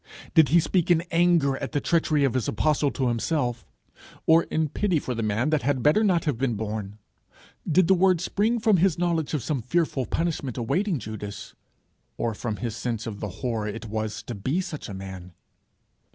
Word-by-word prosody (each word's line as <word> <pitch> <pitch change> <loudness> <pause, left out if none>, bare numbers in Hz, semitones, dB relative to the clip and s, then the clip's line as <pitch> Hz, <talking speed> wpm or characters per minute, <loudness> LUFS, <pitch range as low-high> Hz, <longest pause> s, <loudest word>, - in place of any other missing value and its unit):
Did 160 -5 +6
he 170 +4 +6
speak 175 +1 0
in 170 -2 +5
anger 165 -5 +3
at - - -5
the 145 - +2
treachery 155 -2 +1
of 135 - +2
his 130 -3 -1
apostle 150 +4 +1
to 130 -1 -1
himself, 120 0 -1 0.6
or 165 +1 +5
in 155 0 0
pity 185 +2 0
for 130 -3 -3
the 115 - -3
man 110 +7 0
that 155 -2 +2
had 135 -3 0
better 155 - +4
not 180 -5 +2
have 145 -7 -1
been 130 -4 0
born? 105 -1 -4 0.7
Did 180 +2 +4
the 190 - +6
word 185 -1 +3
spring 210 +6 0
from 215 -3 +4
his 180 -1 +2
knowledge 170 -3 0
of 140 - -2
some 140 -1 -1
fearful 140 0 0
punishment 155 -7 -2
awaiting 175 - 0
Judas, 105 -3 -7 0.6
or 115 -1 -1
from 110 0 -4
his 115 0 -4
sense 115 -2 -3
of 105 -3 -6
the 105 - -4 0.2
horror 115 -3 -1
it 115 +2 -5
was 110 0 -4
to 120 - -6
be 130 - -1
such 155 - -5
a 100 - -6
man? 95 -2 -8
140 Hz, 195 wpm, -25 LUFS, 115-170 Hz, 0.7 s, Did